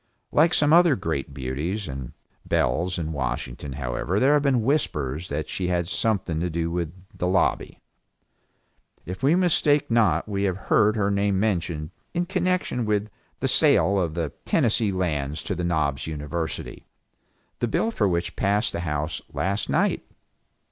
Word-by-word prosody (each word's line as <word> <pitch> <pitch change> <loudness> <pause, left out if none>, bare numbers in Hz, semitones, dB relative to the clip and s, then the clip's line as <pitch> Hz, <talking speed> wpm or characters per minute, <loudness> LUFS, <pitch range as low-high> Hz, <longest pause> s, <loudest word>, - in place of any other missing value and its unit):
Like 165 +3 +4
some 150 +1 +3
other 170 -4 +6
great 80 -6 -3
beauties 70 +10 -3
and 65 -3 -6 0.3
belles 90 +2 0
in 80 -2 -3
Washington 65 0 -4
however 70 +8 -2
there 135 +5 +4
have 150 - +4
been 135 -5 +2
whispers 85 - -1
that 75 +1 -3
she 90 - -2
had 90 -1 0
something 95 -6 0
to 90 +2 -1
do 85 0 -2
with 85 +1 -4
the 90 - -1
lobby. 95 - +1 1.3
If 90 +6 -6
we 140 +5 +4
mistake 155 -7 +2
not 115 -2 +3
we 100 -2 -2
have 95 -2 0
heard 105 +2 +3
her 100 -2 +1
name 100 -1 +1
mentioned 85 -6 -1 0.2
in 175 +1 +1
connection 185 - 0
with 105 -1 0 0.3
the - - +1
sale 100 0 +4
of 85 -4 -1
the 80 -5 -2
Tennessee 110 -2 +2
Lands 75 -6 -2
to - - -2
the 90 -1 -3
Knobs 80 -5 0
University, 80 +1 -5 0.7
the 120 - 0
bill 225 - 0
for 105 - +1
which 85 -1 -1
passed 105 +3 +1
the - - -2
House 75 -1 -2
last 100 +2 -1
night. - - +1
90 Hz, 160 wpm, -25 LUFS, 80-110 Hz, 1.3 s, other